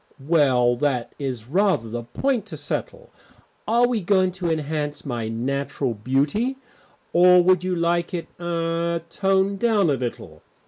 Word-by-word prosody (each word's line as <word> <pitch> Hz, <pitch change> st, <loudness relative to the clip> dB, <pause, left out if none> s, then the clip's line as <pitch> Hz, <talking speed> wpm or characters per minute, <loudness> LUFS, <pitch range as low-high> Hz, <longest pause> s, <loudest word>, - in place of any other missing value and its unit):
"Well, 130 Hz, -7 st, +3 dB
that 130 Hz, -3 st, -1 dB
is 130 Hz, -6 st, -4 dB
rather 180 Hz, -, +1 dB
the 120 Hz, +2 st, -4 dB
point 225 Hz, -, -2 dB
to -, -, -7 dB
settle. -, -, -5 dB, 0.6 s
Are 235 Hz, +2 st, +4 dB
we 240 Hz, -3 st, -1 dB
going 185 Hz, 0 st, +2 dB
to 180 Hz, -1 st, -3 dB
enhance 150 Hz, -1 st, -3 dB
my 120 Hz, -5 st, -3 dB
natural 135 Hz, +3 st, -2 dB
beauty, 145 Hz, -, 0 dB, 0.6 s
or 180 Hz, +1 st, +6 dB
would 185 Hz, 0 st, +3 dB
you 185 Hz, 0 st, -1 dB
like 170 Hz, 0 st, 0 dB
it 175 Hz, -2 st, -3 dB
er 170 Hz, -1 st, -1 dB
toned 195 Hz, 0 st, +1 dB
down 210 Hz, -8 st, +3 dB
a -, -, +3 dB
little? 125 Hz, -3 st, -5 dB
170 Hz, 145 wpm, -23 LUFS, 135-190 Hz, 0.6 s, or